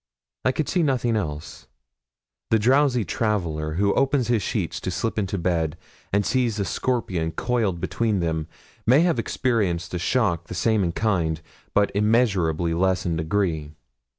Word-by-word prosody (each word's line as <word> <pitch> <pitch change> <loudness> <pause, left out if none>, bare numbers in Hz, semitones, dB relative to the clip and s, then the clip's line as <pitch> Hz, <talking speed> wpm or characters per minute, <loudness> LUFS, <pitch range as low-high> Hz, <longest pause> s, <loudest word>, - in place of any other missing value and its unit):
I - - +3
could 150 +3 -2
see 180 - +1
nothing 125 -6 +1
else. 75 -7 -5 0.8
The 110 - +4
drowsy 125 +1 +3
traveller 80 -7 -1
who 100 +4 +2
opens 135 -3 +1
his 115 -3 +2
sheets - - -2
to - - -4
slip 115 -1 -2
into 100 -1 -2
bed, 85 -3 0 0.3
and 100 0 +2
sees 120 -4 +1
a 100 - 0
scorpion 90 -3 -1
coiled 110 -3 0
between 105 +3 0
them, 80 -2 -1 0.4
may 130 +6 +6
have 170 -2 +2
experienced 95 -10 -1
a 90 - -1
shock 85 -5 0
the - - -6
same 110 +1 +2
in 85 -2 -1
kind, 85 -8 0 0.4
but 105 -1 +3
immeasurably 100 -7 +2
less 95 +2 +1
in 85 -2 0
degree. 80 -2 -1
100 Hz, 155 wpm, -24 LUFS, 85-120 Hz, 0.8 s, may